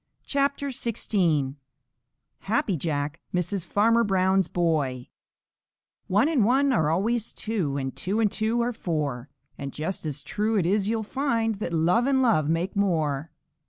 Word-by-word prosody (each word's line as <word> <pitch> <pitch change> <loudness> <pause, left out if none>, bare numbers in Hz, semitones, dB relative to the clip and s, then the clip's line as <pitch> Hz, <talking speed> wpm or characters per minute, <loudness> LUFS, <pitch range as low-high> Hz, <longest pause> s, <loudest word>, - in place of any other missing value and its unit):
CHAPTER 280 0 0
XVI 175 - 0 0.8
HAPPY 205 -2 0
JACK 150 0 -2
MISSES 180 +1 -1
FARMER 230 +6 +3
BROWN'S 190 -2 +2
BOY 150 -9 -1 1.0
One 205 +9 +3
and 305 -8 +2
one 265 +5 +3
are 160 -10 +2
always 215 +7 0
two, 185 -11 -2
And 135 -1 -3
two 200 +4 -2
and 215 -3 +2
two 225 +2 0
are 240 +1 0
four. 150 - -3 0.3
And 140 0 -4
just 160 +3 -4
as 145 -1 -4
true 215 +8 -1
it 185 - +2
is 200 +3 +1
you'll 225 -1 0
find 230 -3 -1
That 210 - -3
love 175 +10 +2
and 275 -1 +3
love 155 - +3
make 170 +4 -1
more. 160 -7 0
190 Hz, 150 wpm, -26 LUFS, 155-225 Hz, 1.0 s, FARMER